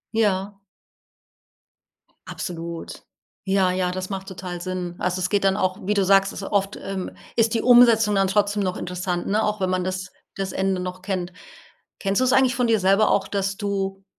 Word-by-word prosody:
Ja. 200 -2 0 1.7
Absolut. 170 -1 -6 0.4
Ja, 190 -1 +2
ja 180 -1 0
das 185 0 -5
macht 195 -1 -5
total 180 -2 -6
Sinn 180 -1 -4
also, 180 +1 -1
es 185 0 -1
geht 200 0 +1
dann 195 0 +3
auch 185 -2 0
wie 205 - +1
du 200 -2 +2
sagst 195 0 +4
ist - - -7
oft, 195 0 -1
ähm, 195 -1 -4 0.2
ist 230 -1 +2
die 225 - +1
Umsetzung 235 -4 +6
dann 195 0 +3
trotzdem 205 +1 +1
noch 185 -1 -2
interessant, 180 0 -3
ne, 215 +2 +1
auch 210 0 -1
wenn 185 -1 0
man 185 0 0
das 185 0 -4 0.2
das 195 -1 -3
Ende 190 -1 0
noch 180 0 -6
kennt. 185 -2 -3 0.7
Kennst 195 +2 0
du - - +3
es 255 - +2
eigentlich 265 -1 +4
von 250 -1 +1
dir 225 -1 +3
selber 195 +3 +4
auch 195 - +2
dass 195 -1 -2
du 195 -2 -3
195 Hz, 190 wpm, -23 LUFS, 185-205 Hz, 1.7 s, Umsetzung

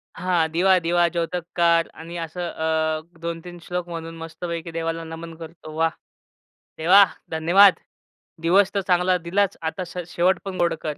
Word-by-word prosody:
हां, 175 -3 +1
दिवा 185 +3 +4
दिवा 175 0 +2
ज्योतकार 170 0 +1
आणि 170 +2 -8
असं 170 +2 -4
अ, 160 0 -1 0.2
2-3 170 +1 -6
श्लोक 180 0 -4
म्हणून 165 0 -6
मस्तपैकी 165 +1 -6
देवाला 165 0 -3
नमन 165 0 -8
करतो. 160 -1 -10
वाह! 165 +1 +2 0.9
देवा, 185 +5 +7 0.3
धन्यवाद. 175 +4 +6 0.7
दिवस 185 +4 +3
तर 200 - 0
चांगला 180 0 +3
दिलाच 190 +3 0
आता 165 +4 -3
स 175 - -11
शेवट 180 +1 +1
पण 190 -1 -5
गोड 170 - +2
कर 150 -2 -4
170 Hz, 150 wpm, -23 LUFS, 165-180 Hz, 0.9 s, देवा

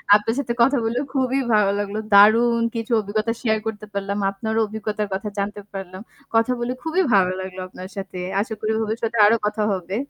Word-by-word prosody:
আপনার 220 +3 +1
সাথে 240 -4 -2
কথা 270 +4 +4
বললে 235 +2 0
খুবই 265 0 +1
ভালো 205 -2 +4
লাগলো। 205 +1 -3 0.2
দারুণ 230 +4 +6
কিছু 230 +1 -4
অভিজ্ঞতা 215 +3 -1
শেয়ার 220 -2 +1
করতে 215 -1 -5
পারলাম। 200 0 -2
আপনারও 220 +3 -2
অভিজ্ঞতার 215 0 -3
কথা 210 +2 -3
জানতে 205 +1 -3
পারলাম। 190 -1 -7 0.3
কথা 225 +2 +3
বলে 240 +1 -2
খুবই 330 +4 +1
ভালো 185 -2 +4
লাগলো 190 0 -6
আপনার 185 0 -10
সাথে। 190 -1 -6 0.2
আশা 220 +2 -4
করি 215 +1 -1
ভবিষ্যতে 220 +1 -3
সাথে 230 +1 -3
আরো 225 - +5
কথা 210 +1 -1
হবে। 185 0 -4
215 Hz, 190 wpm, -22 LUFS, 200-230 Hz, 0.3 s, দারুণ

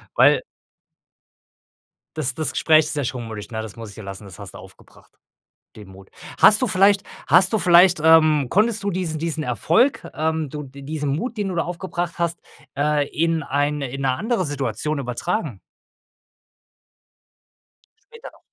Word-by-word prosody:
Weil - - +5 1.8
das 140 -4 -1
das 155 -1 -2
Gespräch 155 -1 +3
ist 150 - -4
ja 145 - 0
schon 125 -1 -4
mutig, 110 -2 -8
na, 110 -1 -4
das 110 -3 -9
muss 115 -2 -9
ich 100 - -14
dir 110 - -10
lassen, 95 +1 -8
das 95 -3 -13
hast - - -10
du - - -8
aufgebracht, - - -17 0.7
den 105 -2 -12
Mut. 95 0 -15 0.3
Hast 215 - +7
du - - +3
vielleicht 195 0 +3 0.2
hast 185 +3 +5
du 220 - +2
vielleicht, 175 -2 +5
ähm 155 -4 +5
konntest 220 +2 +1
du 200 - -1
diesen 170 -4 -3
diesen 160 -2 -3
Erfolg, 160 - +1
ähm, 160 -1 -2
du 150 +1 -6
d 140 +1 -13
diesen 145 0 -3
Mut, 235 - -4
den 205 -2 -2
du 185 - -4
da 170 - 0
aufgebracht 175 0 -4
hast, 170 0 -2 0.4
äh, 145 0 +1
in 165 -1 -1
eine 145 0 -1
in 135 +2 -6
'ne 135 - +2
andere 220 - -1
Situation 140 +1 -2
übertragen? 125 - -3 2.5
Später 460 0 -11
noch. - - -23
155 Hz, 170 wpm, -21 LUFS, 135-175 Hz, 2.5 s, Hast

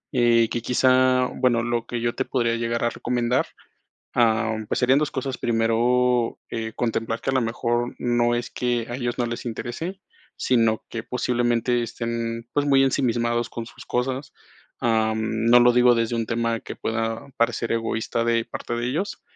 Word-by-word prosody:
Eh, 120 -2 +4
que 120 - -2
quizá, 130 +1 +3
bueno, 125 -2 +1
lo 120 -1 -2
que 120 - -3
yo 120 0 -1
te 130 - -1
podría 120 -3 0
llegar 115 0 -1
a 120 - +1
recomendar, 125 +1 0 0.7
ah, 110 -1 +2
pues, - - 0
serían 130 +2 +4
2 150 -1 0
cosas. 130 -1 -3
Primero, 120 +1 +1
eh, 115 -1 -4
contemplar 115 -1 -2
que 135 - -2
a - - -2
lo 130 - +2
mejor 120 +1 -1
no 120 -1 +2
es 120 0 -2
que 120 -2 -1
a 120 - -3
ellos 120 -1 -3
no 120 - +1
les 120 +1 -5
interese, 125 - -5 0.4
sino 115 -3 +1
que 115 -1 -5
posiblemente 120 -1 0
estén, 115 0 -4
pues, 145 0 +1
muy 135 -1 +4
ensimismados 120 -3 +1
con 115 - -6
sus - - -13
cosas. 130 +2 -2 0.5
Ah, 110 -1 +2
no 110 +2 +3
lo 120 0 +5
digo 125 0 +5
desde 115 0 0
un 115 -1 -1
tema 115 0 -1
que - - -8
pueda 115 +3 -2
parecer 115 0 0
egoísta 115 0 -1
de 115 0 +1
parte - - -6
de 120 0 -2
ellos, 170 +11 -3
120 Hz, 175 wpm, -24 LUFS, 115-125 Hz, 0.7 s, lo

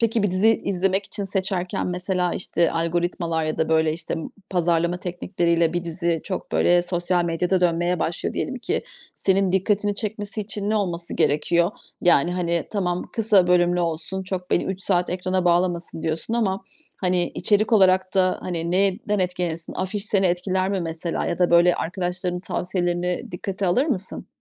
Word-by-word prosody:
Peki 230 -1 +1
bir 205 - +1
dizi 185 +4 +3
izlemek 195 -2 +1
için 205 - -1
seçerken, 190 -2 -1
mesela, 180 0 -1
işte, 170 -2 +1
algoritmalar 170 0 -1
ya 155 - -3
da, 160 - +1
böyle, 160 -1 +3
işte, 165 +1 -4
ı 165 - -5 0.2
pazarlama 170 -1 +1
teknikleriyle 170 -2 0
bir 175 0 -2
dizi 170 0 -1
çok, 190 - -5
böyle, 175 0 +4
sosyal 175 0 0
medyada 175 +2 0
dönmeye 175 0 +1
başlıyor 165 - -2
diyelim 260 - -3
ki. 370 - -2 0.3
Senin 190 -1 +1
dikkatini 205 +2 +1
çekmesi 210 0 -2
için 205 0 -2
ne 215 - +1
olması 175 -4 -2
gerekiyor? 170 +5 +2 0.3
Yani, 175 -1 +3
hani, 170 -2 -1
tamam, 180 -4 -2
"Kısa 210 -5 +4
bölümlü 175 0 +3
olsun, 170 +3 -3
çok 185 -1 -5
beni - - +2
3 190 0 -4
saat 180 -2 +1
ekrana 185 0 -1
bağlamasın 175 -1 0
diyorsun." 165 +8 -2
ama, 200 -5 0 0.3
hani, 180 -2 +1
içerik 215 +2 +2
olarak 185 -3 +4
da 185 -1 +2
hani 170 -2 -3
neyinden 200 +3 +1
etkilenirsin? 180 -3 -1
Afiş 195 +2 0
seni 195 -3 +3
etkiler 185 +2 0
mi 195 - -1
mesela? 165 0 -3
Ya - - -2
da, 180 -1 +2
böyle, 170 +1 +5
arkadaşlarının 180 0 -2
tavsiyelerini 180 -1 -2
dikkate 190 +2 -3
alır 215 - +2
mısın? 190 - -2
180 Hz, 165 wpm, -23 LUFS, 170-195 Hz, 0.3 s, böyle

